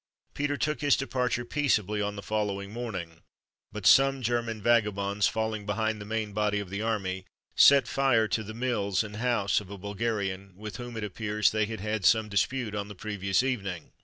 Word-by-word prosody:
Peter 145 0 -1
took 150 +1 -1
his 145 -1 +4
departure 125 -3 -1
peaceably 110 -8 +1
on 105 0 -2
the 100 - -7
following 100 -2 -2
morning; 95 -9 -5 0.5
but - - -7
some 135 -1 +5
German 120 -1 -1
vagabonds, 105 -3 +2
falling 110 -1 -2
behind 110 +1 -1
the - - -7
main 110 -1 -3
body 105 0 +1
of 100 -3 -7
the 100 +1 -3
army, 95 -4 -2 0.3
set 140 -1 +7
fire 130 -5 +2
to 110 - 0
the 110 +1 -8
mills 115 -6 0
and 105 -1 -8
house 115 -4 +1
of 100 - -13
a 100 - -7
Bulgarian, 100 -2 -3
with 105 0 -7
whom, 120 -2 -7
it 110 - -3
appears, 105 +1 0
they 110 -1 +1
had 110 -2 -6
had 105 -1 -2
some 110 +4 +4
dispute 110 +3 0
on 100 -1 -3
the 105 - -9
previous 100 +1 0
evening. 100 - -3
105 Hz, 190 wpm, -28 LUFS, 100-120 Hz, 0.5 s, set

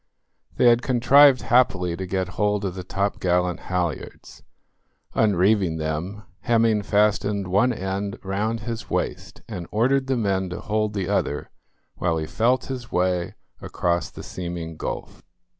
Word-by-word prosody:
They - - +2
had 120 0 +6
contrived 130 +2 +5
happily 95 -8 +2
to 95 +1 -5
get 95 0 -1
hold 105 +1 0
of 95 - -2
the 90 0 -6
topgallant 90 -2 0
halyards. 90 -5 -4 0.7
Unreeving 100 -4 +2
them, 80 +7 -4 0.2
Hemming 115 -2 +2
fastened 105 -1 +1
one 100 +7 +3
end 100 -1 -3
round 105 +4 -2
his 115 +1 -5
waist, - - -3
and 85 -2 -6
ordered 130 +5 +1
the 130 -1 +1
men 95 -4 0
to 90 - -5
hold 110 0 -1
the 95 -3 -2
other 95 -7 -1 0.5
while 85 -2 0
he 80 - -2
felt 120 +9 +1
his 125 -3 -6
way 90 -1 0 0.3
across 85 0 -1
the - - -10
seeming 85 -2 -6
gulf. - - -6
100 Hz, 140 wpm, -24 LUFS, 90-110 Hz, 0.7 s, had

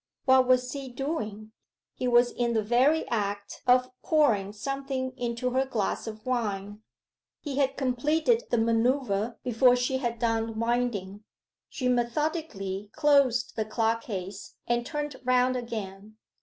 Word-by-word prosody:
What 260 -1 +5
was 250 0 +3
he 275 -1 -6
doing? 230 -6 -4 0.4
He 250 - -3
was 240 0 +4
in 240 -1 -1
the 220 - +2
very 260 +8 +3
act 205 -3 -3
of 250 0 +4
pouring 225 -11 +2
something 265 +3 -3
into 245 0 -2
her 260 +1 +2
glass 230 -5 -2
of 215 -1 -8
wine. 210 -4 -2 0.6
He 280 -3 -5
had 270 -1 +1
completed 300 - +1
the 240 - +1
manoeuvre 230 -1 +1
before 245 +1 +4
she 250 +1 0
had 240 -3 -2
done 225 -1 -1
winding. 230 -4 -1 0.5
She 255 - -3
methodically 240 - -1
closed 280 -5 +3
the 220 - 0
clock 225 +1 0
case 195 -3 -7
and 240 0 0
turned 295 -3 -4
round 255 0 +3
again. 215 -3 -6
240 Hz, 140 wpm, -27 LUFS, 220-260 Hz, 0.6 s, What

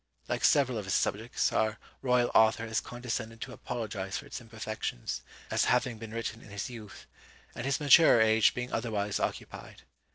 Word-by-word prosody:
Like - - -2
several 130 -5 +4
of 105 - -6
his 95 - 0
subjects, 110 +4 0
our 110 0 +1 0.2
royal 125 -2 +2
author 110 +1 +4
has 110 0 -1
condescended 115 -2 -5
to 130 - -6
apologise 105 -5 -4
for - - -8
its - - -7
imperfections, 110 - -5 0.3
as - - +2
having 125 -2 +1
been 115 -1 -7
written 115 0 -4
in - - -14
his 100 +4 -5
youth, 110 -4 -10 0.5
and 120 - -5
his 140 - +1
maturer 150 -3 +7
age 110 -1 +4
being 125 +1 -4
otherwise 105 -4 -1
occupied. - - -5
115 Hz, 170 wpm, -30 LUFS, 110-125 Hz, 0.5 s, maturer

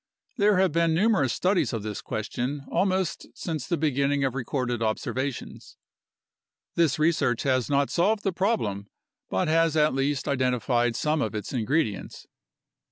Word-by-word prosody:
There 205 -2 +4
have 185 -2 +3
been 165 0 +2
numerous 190 - +3
studies 180 - +1
of 110 -3 -3
this 105 -1 -5
question 125 +6 -4
almost 190 -2 0
since 155 -6 -4
the 170 - 0
beginning 140 -1 +1
of 135 -2 0
recorded 125 -2 -2
observations. 125 +4 -3 1.0
This 165 -5 +2
research 155 -7 +1
has 130 -2 +1
not 140 0 +1
solved 205 +5 +1
the 195 - 0
problem 140 - -1 0.4
but 95 - 0
has 165 0 +2
at 150 0 +3
least 135 0 -1
identified 125 -3 +1
some 150 +6 0
of 110 -4 -2
its 105 +3 -5
ingredients. 115 - -1
140 Hz, 145 wpm, -26 LUFS, 120-165 Hz, 1.0 s, There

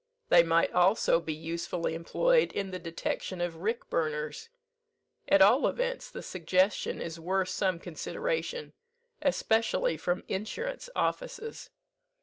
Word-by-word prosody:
They 170 - +8
might 165 0 +2
also 180 -1 +4
be 165 -1 -4
usefully 170 +1 -3
employed 475 - +2
in 195 -1 -3
the 185 - -4
detection 170 +2 -4
of 175 -2 -2
rick 220 +7 -2
burners. 150 - -2 0.8
At - - +7
all - - +5
events - - -2
the - - -8
suggestion 185 +3 +1
is 165 0 -5
worth 185 +2 0
some 185 -3 0
consideration, 475 - -3 0.5
especially 280 - +1
from 175 +1 -1
insurance 465 - -4
offices. 455 -2 -3
185 Hz, 125 wpm, -30 LUFS, 165-280 Hz, 0.8 s, They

